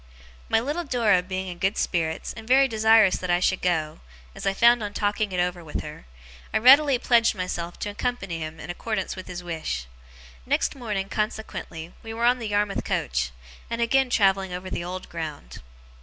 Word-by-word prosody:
My - - +4
little 295 +9 -2
Dora 230 - +3
being 185 +1 -4
in 175 -1 -7
good 190 +3 0
spirits, 160 -3 -1
and 225 -1 -11
very 270 +2 +5
desirous 220 -4 +5
that 180 - -5
I 175 0 +3
should 185 +1 +1
go 160 -4 0 0.3
as - - -5
I 195 - +2
found 235 +2 +5
on 205 -1 -4
talking 205 0 0
it 180 - -2
over 175 -1 -1
with 155 - -5
her 150 - -9 0.5
I - - +2
readily 270 +4 +7
pledged 235 -2 +3
myself 175 -2 -4
to - - -2
accompany 205 -5 -3
him 155 0 -6
in - - -6
accordance 205 +2 -3
with 185 - -9
his 180 -1 -6
wish. 160 - -4 0.6
Next - - 0
morning, 210 -7 -3
consequently, 210 -6 -4
we 225 0 -7
were 235 +1 0
on 250 +1 +4
the 230 - -4
Yarmouth 205 -1 0
coach, - - -1 0.4
and 230 - -3
again 260 +3 +3
travelling 195 -4 +2
over 180 +1 -6
the - - -3
old 185 +1 -6
ground. 155 - -7
195 Hz, 190 wpm, -25 LUFS, 175-230 Hz, 0.6 s, readily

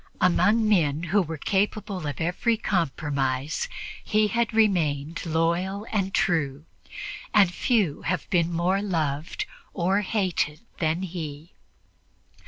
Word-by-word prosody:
Among 210 +5 +4
men 160 -7 +2
who 195 +5 +2
were 160 -2 -4
capable 200 0 -1
of 145 - -4
every 180 +8 +1
compromise 145 - -1 0.3
he 215 -1 +2
had 235 0 +1
remained 170 -8 +1
loyal 170 +5 0
and 195 -3 0
true, 150 -6 0 0.7
and 195 -4 +6
few 200 - +1
have 175 +1 -2
been 170 -2 +2
more 180 +4 +1
loved 160 -6 -2 0.3
or 190 +4 +2
hated 185 -7 -1 0.2
than 165 +1 0
he. 160 -3 -6
175 Hz, 115 wpm, -26 LUFS, 155-205 Hz, 0.7 s, and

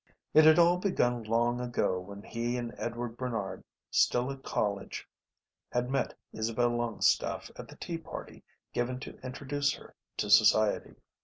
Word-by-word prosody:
It 155 - +8
had 155 +1 +8
all 175 +1 +6
begun 125 - +1
long 120 +2 +1
ago 120 -6 0
when 100 +2 -9
he 120 +1 -2
and 120 -1 -4
Edward 120 0 -4
Barnard, 115 -6 -3 0.3
still 125 +2 +3
at 135 -1 -8
college, 100 -6 -2 0.6
had 125 +1 -1
met 135 -1 -1 0.2
Isabel 115 +2 +1
Longstaffe 120 -2 +1
at - - -9
the - - -12
tea 165 -1 -5
party 165 - -9 0.3
given 125 +1 -1
to - - -9
introduce 140 +2 -1
her - - -14 0.2
to 105 - -1
society. 110 0 +5
120 Hz, 150 wpm, -30 LUFS, 110-130 Hz, 0.6 s, It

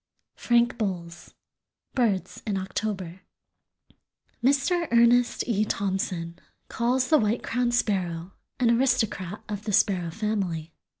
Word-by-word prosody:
—Frank 240 0 +2
Bolles, 175 -5 -4 0.6
"Birds 220 -8 0
in 200 -2 0
October." 190 -2 -4 1.2
Mr. 285 +6 +2
Ernest 235 +1 +4
E. 215 -3 +2
Thompson 185 -5 -2 0.3
calls 250 +2 0
the 310 - +6
White 220 +1 0
crowned 240 0 0
Sparrow 180 -6 -1 0.3
an 240 -2 +4
aristocrat 220 -6 0
of 205 -2 -5
the 215 - -1
sparrow 185 -4 +2
family. 180 -5 -3
210 Hz, 110 wpm, -26 LUFS, 185-240 Hz, 1.2 s, the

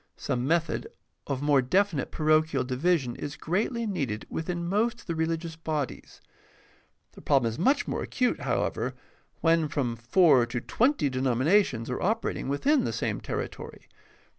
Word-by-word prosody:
Some 125 +1 -2
method 165 - 0 0.4
of 140 -1 -2
more 145 -2 +4
definite 165 +2 +1
parochial 155 -3 +2
division 130 0 0
is 145 0 -5
greatly 225 +7 -1
needed 135 - -3
within 170 +1 -3
most 230 +5 0
of - - -19
the 170 - -2
religious 165 0 -2
bodies. 155 -4 -4 0.9
The - - -14
problem 135 -5 +3
is 115 +1 -4
much 270 - +2
more - - -2
acute, 250 -2 0
however, - - -1 0.5
when 165 -1 +3
from 135 -5 -1
four 125 +1 +4
to 120 0 -3
twenty 245 - +1
denominations 130 - +2
are 125 - -3
operating 210 -8 -1
within 270 - +2
the - - -1
same - - -2
terri - - -3
tory. - - -11
155 Hz, 150 wpm, -27 LUFS, 130-180 Hz, 0.9 s, more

